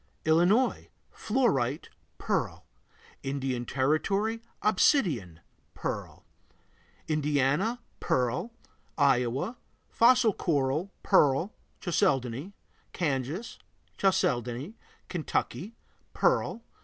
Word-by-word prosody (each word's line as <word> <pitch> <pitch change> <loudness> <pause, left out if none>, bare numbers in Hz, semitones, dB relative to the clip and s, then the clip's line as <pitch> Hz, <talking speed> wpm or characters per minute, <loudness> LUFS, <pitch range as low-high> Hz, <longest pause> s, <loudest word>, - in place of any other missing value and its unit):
Illinois 175 +11 +3 0.2
Fluorite, 165 - 0 0.3
pearl. - - -2 0.6
Indian 135 -3 -2
Territory 195 - 0 0.2
Obsidian, 160 - +2 0.3
pearl. - - -5 0.8
Indiana 150 - +1 0.2
Pearl. 125 - 0 0.5
Iowa 135 - +1 0.3
Fossil 240 -2 +5
coral, 150 +2 0
pearl, 145 +8 +3 0.3
chalcedony. 140 - 0 0.4
Kansas 150 - -2 0.4
Chalcedony. 125 - 0 0.3
Kentucky 180 +4 -3 0.4
Pearl. 485 - +1
155 Hz, 65 wpm, -28 LUFS, 130-210 Hz, 0.8 s, Fossil